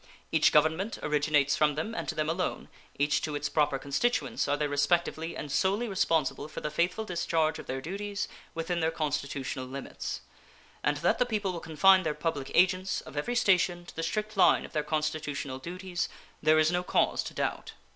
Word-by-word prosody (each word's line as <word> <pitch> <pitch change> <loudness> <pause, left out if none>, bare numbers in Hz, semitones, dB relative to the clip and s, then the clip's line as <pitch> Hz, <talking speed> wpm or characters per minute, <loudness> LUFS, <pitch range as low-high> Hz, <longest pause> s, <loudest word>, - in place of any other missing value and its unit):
Each - - +4
Government 160 +8 +2
originates 150 -1 +2
from 150 -1 +2
them, 160 +9 -3
and - - -4
to - - -2
them 155 -1 0
alone, 170 +3 -2 0.3
each 145 +1 +2
to 150 -1 -3
its 145 0 -2
proper 145 -3 +2
constituents, 190 - 0
are 145 +1 +1
they 150 - 0
respectively 160 +3 0
and 145 - -6
solely 200 - +1
responsible 165 - 0
for 155 - -7
the 150 - -4
faithful 175 +7 0
discharge 165 -4 0
of - - -9
their 130 +1 -3
duties 200 +5 -4 0.3
within 165 +1 -1
their 160 -1 +2
constitutional 145 -4 -3
limits; 135 +1 -5 0.6
and 145 0 +1
that - - +3
the 250 - +4
people 210 -5 -1
will 170 - -4
confine 175 +5 +5
their 155 -4 -2
public 150 -3 -2
agents 185 +1 +3
of - - -12
every 195 +12 -1
station 180 -5 +2
to - - -12
the 165 - -3
strict 215 +5 -2
line 195 - +5
of - - -13
their 155 - +1
constitutional 150 -3 -2
duties 180 +4 -4 0.3
there 155 0 +5
is 155 +1 +4
no 180 0 +1
cause 180 - +1
of - - -18
doubt. - - -2
160 Hz, 190 wpm, -29 LUFS, 150-185 Hz, 0.6 s, confine